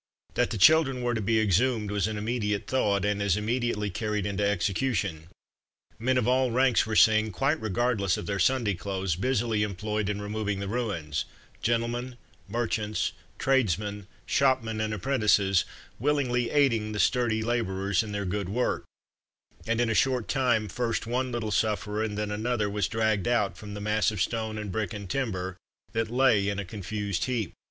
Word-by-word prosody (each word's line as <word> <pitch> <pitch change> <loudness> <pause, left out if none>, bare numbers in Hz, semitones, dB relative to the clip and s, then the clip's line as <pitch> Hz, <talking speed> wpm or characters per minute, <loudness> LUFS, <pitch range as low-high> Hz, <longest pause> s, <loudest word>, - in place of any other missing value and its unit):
That 120 - +1
the 115 - -3
children 135 +2 +5
were 120 0 +1
to 110 - -1
be 110 +2 +2
exhumed 110 +1 +2
was 105 -1 +1
an 110 -1 -3
immediate 105 -2 -1
thought, 100 -7 +1
and 105 0 0
as 100 -2 +2
immediately 110 -2 -1
carried 105 0 -2
into 100 0 -1
execution. 100 -4 0 0.7
Men 130 +3 +1
of 125 -2 +1
all 130 0 +3
ranks 125 -1 +3
were 110 - -2
seen, 110 0 +5
quite 135 - 0
regardless 110 -2 +1
of - - -5
their 100 +1 -2
Sunday 120 0 +2
clothes, 95 -1 -2
busily 115 +1 0
employed 105 +1 -2
in 105 0 -2
removing 105 -1 -2
the 100 - -4
ruins 95 -11 -2 0.4
gentlemen, 120 +2 -1 0.3
merchants, 110 -3 -1 0.3
tradesmen, 105 -6 0 0.2
shopmen 125 -5 +1
and 110 0 -1
apprentices, 105 -5 +2 0.3
willingly 125 -3 +1
aiding 115 -7 +2
the 105 - -3
sturdy 115 -3 +2
labourers 100 -5 0
in 110 -2 -6
their 100 -1 -2
good 95 0 -2
work, 120 +5 -1 0.8
and, 115 +1 +1
in 120 - +2
a 115 - +1
short 125 0 +1
time, 125 -6 +1
first 115 +3 -2
one 125 +2 -1
little 115 -3 -2
sufferer, 105 +1 0
and 105 -2 -2
then 105 0 -2
another, 110 0 -1
was 100 -3 0
dragged 110 -2 0
out 115 -5 +1
from 105 -1 -8
the - - -5
mass 105 0 +2
of 105 -3 -5
stone 110 +3 -1
and 105 -2 -4
brick 110 +2 -2
and 100 -3 -6
timber 95 -9 -2 0.4
that 115 0 0
lay 120 -5 +3
in 100 - -2
a 100 - -3
confused 100 0 -3
heap. 120 -8 -2
110 Hz, 175 wpm, -27 LUFS, 100-120 Hz, 0.8 s, children